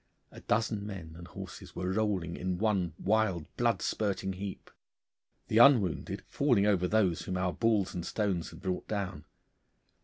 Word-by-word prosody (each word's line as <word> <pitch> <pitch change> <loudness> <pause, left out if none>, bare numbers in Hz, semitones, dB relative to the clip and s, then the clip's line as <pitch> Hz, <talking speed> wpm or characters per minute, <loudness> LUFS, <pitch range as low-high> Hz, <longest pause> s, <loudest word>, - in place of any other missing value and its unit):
A - - -12
dozen 110 -1 0
men 95 -6 -7
and 85 +1 -10
horses - - -9
were 90 0 -2
rolling 95 -5 0
in 90 0 -2
one 95 -6 0
wild 100 -6 +1
blood 120 -1 +1
spurting 95 -2 -1
heap, 95 +1 -7 0.8
the 110 - +3
unwounded 120 - +4
falling 125 -8 +2
over 95 -4 +3
those 95 -5 +2
whom 95 - -3
our 90 -1 0
balls 110 -5 +1
and 90 - -4
stones 95 -3 -1
had - - -12
brought 95 -2 -3
down. 100 -3 -3
100 Hz, 155 wpm, -31 LUFS, 90-110 Hz, 0.8 s, unwounded